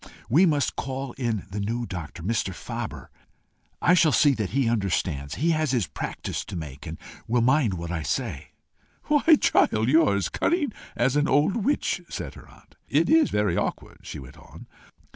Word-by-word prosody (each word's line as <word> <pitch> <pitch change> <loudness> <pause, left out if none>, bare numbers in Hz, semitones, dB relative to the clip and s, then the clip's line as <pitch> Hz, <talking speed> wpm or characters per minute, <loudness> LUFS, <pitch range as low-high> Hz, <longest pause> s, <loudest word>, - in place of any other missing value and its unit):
We 170 +10 +5
must 145 -5 +1
call 135 0 -4
in 115 -6 -2
the 105 - -4
new 115 +4 -2
doctor, 85 -4 -7
Mr. 95 -2 -1
Faber. - - -6 0.7
I 180 - +5
shall 170 -3 +5
see 145 0 +5
that 110 -6 -2
he 135 -2 +1
understands. 90 -10 -1
He 165 +4 +1
has 155 -2 +1
his 120 -6 +1
practice - - -5
to - - -8
make, 75 -3 -7
and 80 +1 -6 0.3
will 120 +1 +2
mind 130 -5 +3
what 85 0 -5
I 85 -2 -2
say." 75 - -3 0.6
"Why, 300 +2 +5
child, 110 +2 +3
you 160 +4 +6
are 100 - +2
as 100 -5 -1
cunning 305 - 0 0.2
as 125 +3 +1
an 150 0 +2
old 145 - +3
witch!" 255 +7 0
said - - -5
her - - -14
aunt. - - -20 0.2
"It - - +2
is 320 -1 +5
very 105 -4 +1
awkward," - - -3
she - - -8
went 65 -2 -11
on. - - -13
120 Hz, 185 wpm, -25 LUFS, 95-150 Hz, 0.7 s, you